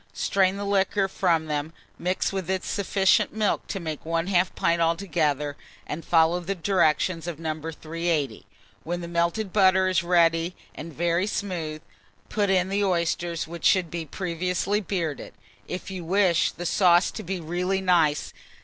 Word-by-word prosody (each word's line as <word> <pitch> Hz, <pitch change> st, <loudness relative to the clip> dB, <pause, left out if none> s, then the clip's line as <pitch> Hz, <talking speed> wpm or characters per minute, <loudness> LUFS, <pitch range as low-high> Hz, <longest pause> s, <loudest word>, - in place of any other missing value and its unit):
Strain 190 Hz, -1 st, +1 dB
the 200 Hz, -, -4 dB
liquor 200 Hz, 0 st, +1 dB
from 170 Hz, -4 st, +1 dB
them, 150 Hz, +1 st, -3 dB, 0.3 s
mix 180 Hz, +2 st, -1 dB
with 190 Hz, -2 st, -3 dB
it 190 Hz, -1 st, -1 dB
sufficient 195 Hz, 0 st, +1 dB
milk 215 Hz, -2 st, 0 dB
to 195 Hz, -, -4 dB
make 160 Hz, -4 st, -5 dB
1/2 175 Hz, +3 st, 0 dB
pint 170 Hz, 0 st, +1 dB
altogether, 160 Hz, -4 st, 0 dB, 0.3 s
and 160 Hz, +2 st, -5 dB
follow 165 Hz, +1 st, +3 dB
the 185 Hz, +3 st, -3 dB
directions 170 Hz, -1 st, +1 dB
of 170 Hz, -3 st, -4 dB
No. 160 Hz, -1 st, -2 dB
380. 160 Hz, -4 st, -3 dB, 0.4 s
When 175 Hz, +2 st, -3 dB
the 170 Hz, -, -6 dB
melted 170 Hz, +4 st, -1 dB
butter 190 Hz, -2 st, +4 dB
is 185 Hz, -1 st, +2 dB
ready 170 Hz, 0 st, +2 dB, 0.2 s
and 165 Hz, +2 st, -8 dB
very 170 Hz, +4 st, 0 dB
smooth, 165 Hz, -7 st, -4 dB, 0.5 s
put 205 Hz, -2 st, 0 dB
in 185 Hz, -1 st, +2 dB
the 200 Hz, +1 st, 0 dB
oysters, 170 Hz, -2 st, 0 dB
which 170 Hz, 0 st, -9 dB
should 180 Hz, -4 st, +3 dB
be 165 Hz, -2 st, -4 dB
previously 180 Hz, +5 st, -1 dB
bearded, 170 Hz, -7 st, -4 dB, 0.3 s
if 185 Hz, -, -6 dB
you 185 Hz, -2 st, -5 dB
wish 180 Hz, -1 st, +2 dB
the 175 Hz, -, -7 dB
sauce 175 Hz, 0 st, +4 dB
to -, -, -6 dB
be 185 Hz, +1 st, -4 dB
really 180 Hz, +4 st, -1 dB
nice. 170 Hz, -6 st, +2 dB
175 Hz, 160 wpm, -25 LUFS, 165-190 Hz, 0.5 s, butter